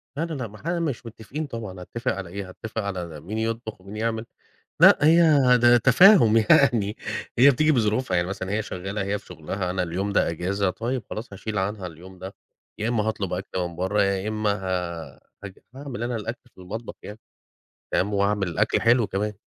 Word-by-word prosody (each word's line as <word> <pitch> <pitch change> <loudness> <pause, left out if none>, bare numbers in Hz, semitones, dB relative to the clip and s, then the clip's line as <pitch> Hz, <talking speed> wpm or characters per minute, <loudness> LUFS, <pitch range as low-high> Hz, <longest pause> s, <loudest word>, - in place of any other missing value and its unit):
لا، 160 +3 -1
لا، 165 - -6
لا، 130 -5 -4
مح 105 +8 -15
مش 165 -9 -2
متفقين 115 +7 -6
طبعًا، 110 -7 -7
هاتفق 120 +7 -3
على 95 -3 -6
إيه؟! 95 0 -6
هاتفق 110 +4 -5
على 90 -6 -5
مين 105 +4 -5
يطبخ 110 -2 -3
ومين 100 +3 -10
يعمل. 110 0 -2 0.5
لأ، - - +8
هي 165 +3 +6 0.4
ده 120 0 +6
تفاهم 125 - +6
يعني. 110 -2 +3 0.4
هي 140 +3 +8
بتيجي 155 +4 +2
بظروفها 110 -4 +1
يعني 85 +1 0
مثلًا 95 0 -4
هي 110 +1 0
شغالة، 95 +1 -4
هي 100 +1 -2
في - - -23
شغلها، 90 +2 -5
أنا 90 -1 -1
اليوم 95 +4 -2
ده - - +2
أجازة، 95 +4 -1
طيب 120 +4 -3
خلاص 110 -1 -6
هاشيل 105 +2 -5
عنها 95 -1 -3
اليوم 90 +3 -13
ده. 95 +1 -8 0.4
يا 110 +2 -1
إما 115 -3 +1
هاطلب 100 -4 -2
أكل 95 0 -4
من 85 -1 -3
برا، 95 +4 0
يا 100 +1 0
إما 110 -1 0
ه 90 -4 -4 0.6
هاعمل 135 -4 -6
أنا 120 0 -2
الأكل 115 +3 -5 0.2
في 95 - -14
المطبخ 110 +6 -7
يعني. 105 +2 -9 0.7
تمام، 100 +2 +1
وأعمل 100 -1 +1
الأكل 85 - +1
حلو 115 -1 +4
كمان. 105 +2 -2
105 Hz, 190 wpm, -24 LUFS, 95-115 Hz, 0.7 s, لأ